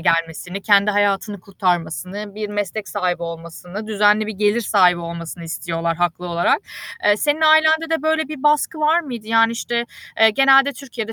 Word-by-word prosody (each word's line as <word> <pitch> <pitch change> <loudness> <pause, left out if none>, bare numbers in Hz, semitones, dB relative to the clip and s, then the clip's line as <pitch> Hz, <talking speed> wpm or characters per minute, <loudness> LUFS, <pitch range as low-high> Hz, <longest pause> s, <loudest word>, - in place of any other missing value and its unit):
gelmesini, 165 +3 -1
kendi 205 0 +4
hayatını 205 0 0
kurtarmasını, 185 +2 -3
bir 210 0 -5
meslek 205 0 -4
sahibi 180 -4 -2
olmasını, 170 +4 -8
düzenli 210 0 +2
bir 220 - -4
gelir 210 +3 +1
sahibi 180 -5 +3
olmasını 170 0 -7
istiyorlar, 165 0 -3
haklı 175 0 -2
olarak. 170 0 +1 0.5
Eee, 205 0 +4
senin 295 +6 0
ailende 315 +1 +4
de 325 -3 -1
böyle 315 -2 0
bir 300 -4 -8
baskı 300 +1 +1
var 315 +3 +3
mıydı? 240 -9 -8
Yani, 225 0 +3
işte, 235 +1 -2 0.4
eee, 220 0 +7
genelde 270 +4 +4
Türkiye'de 245 -5 -7
205 Hz, 160 wpm, -20 LUFS, 180-250 Hz, 0.5 s, eee